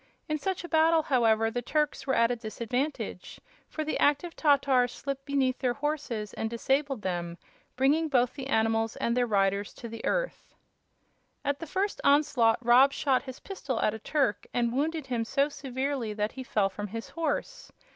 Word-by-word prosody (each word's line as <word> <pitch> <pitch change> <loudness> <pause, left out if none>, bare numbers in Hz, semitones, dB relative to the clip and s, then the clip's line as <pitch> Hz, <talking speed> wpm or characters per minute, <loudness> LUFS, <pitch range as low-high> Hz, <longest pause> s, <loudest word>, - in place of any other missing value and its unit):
In 305 0 -1
such 375 +3 -2
a - - -6
battle, 320 0 +4
however, 225 -5 +2
the 245 - -2
Turks 295 +1 -1
were 265 - +2
at 230 +1 +3
a - - 0
disadvantage, 240 +5 -4 0.3
for 310 - -3
the 310 - -2
active 295 +4 +2
Tatars 275 -4 +3
slipped 275 0 -5
beneath 270 -2 +1
their 245 -2 0
horses 280 -8 -3
and 220 - -3
disabled 270 +1 -1
them, 175 -2 -3 0.4
bringing 290 +5 +3
both 250 -4 +2
the 270 -2 -6
animals 225 -2 +1
and 235 - -1
their 245 -1 +2
riders 200 -1 +1
to 235 - -8
the 230 0 -8
earth. - - -2 0.9
At 285 0 0
the 330 - -6
first 390 +5 -1
onslaught 280 -6 +4
Rob 255 +4 +6
shot 270 -3 +1
his 260 -2 -9
pistol 280 - -4
at 210 - +2
a 220 - -6
Turk 275 -2 0
and 235 -1 +1
wounded 310 +3 -1
him 245 -3 -1
so 275 +5 +1
severely 265 -4 -3
that 210 0 -1
he 265 - -8
fell 210 -5 +1
from 205 +2 -5
his 225 +3 -7
horse. 330 +10 -3
260 Hz, 180 wpm, -28 LUFS, 225-290 Hz, 0.9 s, Rob